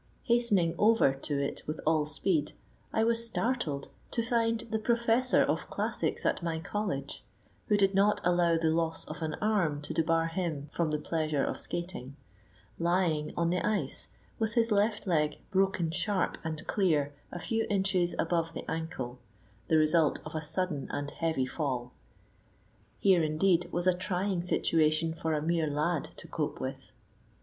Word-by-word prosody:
Hastening 225 -9 +3
over 215 -10 +5
to 140 +1 -3
it 140 - -2
with 155 +1 -3
all 155 -1 +2
speed, 155 -1 0 0.4
I 220 - +2
was 230 0 +4
startled 230 - -1 0.2
to 230 - -1
find 230 -1 +1
the 220 -1 -3
professor 235 +2 +3
of - - -1
classics - - -2
at - - +1
my 165 -1 -2
college—who 195 +2 -4
did 195 -1 +3
not 200 +2 +3
allow 175 -1 +3
the 160 -1 +2
loss 165 0 -1
of - - -8
an 155 -1 -2
arm 190 -9 +1
to - - -5
debar 165 0 +2
him 165 -4 -3
from 170 -2 0
the 150 - 0
pleasure 155 -2 -1
of - - -3
skating—lying 155 - -3
on 170 0 +2
the 180 - 0
ice, 210 0 0 0.3
with 220 +1 -1
his 230 -1 +3
left 210 +1 +2
leg 150 -5 +1
broken 190 -4 +1
sharp 185 +2 0
and 160 -1 -4
clear 155 -8 +1 0.2
a - - -5
few 225 +5 -1
inches 190 -3 +1
above 165 -1 0
the - - -5
ankle, 130 -6 -4 0.5
the 160 - +4
result 155 0 +4
of 155 - -7
a 155 - -2
sudden 160 -2 -2
and 145 0 -3
heavy 160 -6 0
fall. 130 -3 -3 1.1
Here, 190 -4 +4
indeed, 170 +3 +2
was 175 +1 -1
a 185 - +5
trying 185 0 -1
situation 160 -2 +2
for 160 -1 -1
a 150 - -1
mere 165 -1 +1
lad 150 +2 0
to - - -10
cope - - -3
with. - - -6
170 Hz, 160 wpm, -30 LUFS, 155-195 Hz, 1.1 s, over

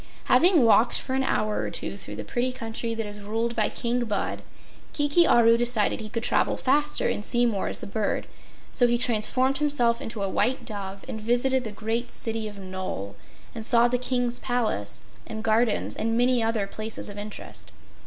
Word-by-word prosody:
Having 350 -6 +5
walked 230 +1 +4
for 260 - -5
an 265 0 +1
hour 215 -5 0
or - - -2
two - - -2
through - - -8
the - - -5
pretty 250 +1 -1
country 230 -1 -4
that 225 -1 -3
is 205 0 -7
ruled 225 +3 -2
by 215 -2 +2
King 240 +1 -1
Bud, 210 -2 -2 0.5
Kiki 290 +4 +3
Aru 230 -1 +6
decided 240 -3 +1
he 215 - -7
could 230 +1 -3
travel - - +1
faster 295 +3 +2
and 205 - -2
see 240 +2 +2
more 210 -5 0
as - - -5
a - - -3
bird, 210 +1 -1 0.5
so 245 - +3
he 240 0 +2
transformed 255 +3 +1
himself 245 -6 +2
into 225 -3 -5
a - - 0
white 245 +5 0
dove 200 -3 -6
and 220 - -5
visited 245 +3 +1
the 220 - -4
great 225 +3 -2
city 225 -1 -1
of 205 -1 -9
Nole 185 - -5 0.4
and 225 - -6
saw 235 +1 +4
the 250 0 0
King's 245 -1 0
palace 230 - -2 0.2
and 220 0 -6
gardens 220 0 +1
and 225 +1 0
many 245 0 +3
other 225 -2 0
places 215 +2 -6
of 205 0 -7
interest. 210 +1 -9
230 Hz, 195 wpm, -26 LUFS, 215-245 Hz, 0.5 s, Aru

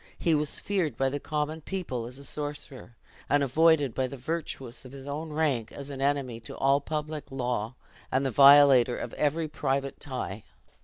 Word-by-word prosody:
He 165 - +1
was 150 -1 0
feared 175 - -1
by 135 0 +2
the 145 +2 -3
common 155 +2 -3
people 150 -10 -4
as 125 +2 -9
a 140 - -10
sorcerer; 145 -4 -6 0.3
and 145 +1 +3
avoided 145 -1 +3
by 130 -1 0
the 140 - -8
virtuous 135 -3 -5
of 130 - -11
his 135 0 -10
own 150 +3 -4
rank, 150 -7 0
as 140 0 -8
an 135 -1 -6
enemy 135 -4 0
to 115 - -9
all 135 +1 +3
public 155 0 -4
law, 125 -3 -2 0.4
and 130 +2 +1
the 135 - 0
violator 135 -2 +7
of - - -5
every 155 +2 0
private 140 -2 -2
tie. 125 -7 -5
140 Hz, 185 wpm, -28 LUFS, 130-150 Hz, 0.4 s, violator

